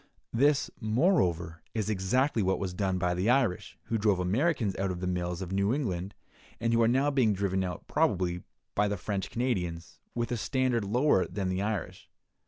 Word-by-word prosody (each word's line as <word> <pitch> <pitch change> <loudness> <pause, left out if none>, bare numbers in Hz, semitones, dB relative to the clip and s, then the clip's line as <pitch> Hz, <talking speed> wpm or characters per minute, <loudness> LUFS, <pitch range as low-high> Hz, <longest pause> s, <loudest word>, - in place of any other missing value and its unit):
This, 140 +4 +3
moreover, 110 - +1
is 110 -3 -1
exactly 110 +6 +1
what 95 -1 +1
was 95 -2 -3
done 95 0 0
by 90 -1 +1
the 90 +5 0
Irish, 125 -8 +1
who 115 - -2
drove 100 -3 +2
Americans 110 - +1
out 95 0 0
of 90 -1 -3
the 90 - -3
mills 90 0 -2
of 90 - -7
New 100 +2 +1
England, 95 -9 -3 0.4
and 115 0 0
who 115 - +4
are 115 - +5
now 135 +5 +2
being 125 -7 +3
driven 95 -1 0
out, 90 -2 -5
probably, 90 -1 +1 0.3
by 105 0 +2
the 100 0 -2
French 100 +1 -3
Canadians, 90 -9 -2 0.2
with 120 0 -2
a 120 - 0
standard 130 -1 0
lower 120 -1 +2
than 95 -3 -3
the 95 +1 -1
Irish. 105 -3 -4
100 Hz, 190 wpm, -29 LUFS, 90-120 Hz, 0.4 s, are